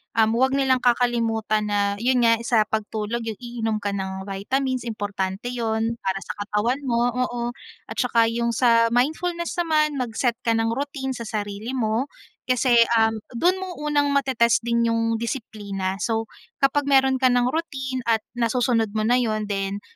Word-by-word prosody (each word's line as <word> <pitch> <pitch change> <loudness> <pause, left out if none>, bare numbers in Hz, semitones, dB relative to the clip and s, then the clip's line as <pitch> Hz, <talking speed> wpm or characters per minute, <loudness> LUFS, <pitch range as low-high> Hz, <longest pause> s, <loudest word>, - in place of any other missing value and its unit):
um, 220 -1 +4
‘wag 260 +2 +3
nilang 265 -2 +2
kakalimutan 230 -3 +1
na 200 0 +1
'yon 250 +1 +2
nga, 230 0 +5
sa 230 -3 +2
pagtulog 220 +1 -3
yung 220 -2 -5
iinom 235 -3 -3
ka 205 -1 -3
ng 190 0 -5
vitamins 255 +6 -1
importante 205 -2 -3
yun 225 -1 -1
para 190 0 -1
sa - - -5
katawan 220 +7 -1
mo, 240 -1 +1
oo. 245 -1 -1 0.5
At - - -7
saka 230 -2 +3
yung 235 +1 0
sa 230 -1 +3
mindfulness 335 +7 0
naman 305 -2 +1
mag-set 240 0 -1
ka 230 - +2
ng 225 0 +1
routine 265 0 -3
sa 235 - -6
sarili 210 +1 -4
mo 225 +1 0 0.4
kasi, 250 -1 +3 0.2
um, 225 -1 +3 0.2
do’n 355 +10 +2
mo 375 -1 -5
unang 295 -1 +1
mate-test 255 -4 +2
din 235 0 +1
yung 230 0 +1
disiplina. 205 -5 -4
So, 225 +1 -2 0.3
kapag 275 +1 +2
meron 265 -1 +4
ka 260 - 0
ng 245 -1 +3
routine 265 -5 -3
at 225 -2 +2 0.2
nasusunod 230 -2 +1
mo 215 - 0
na 240 +3 +3
'yon 215 -4 -1
then, 195 0 -2
235 Hz, 165 wpm, -23 LUFS, 220-255 Hz, 0.5 s, nga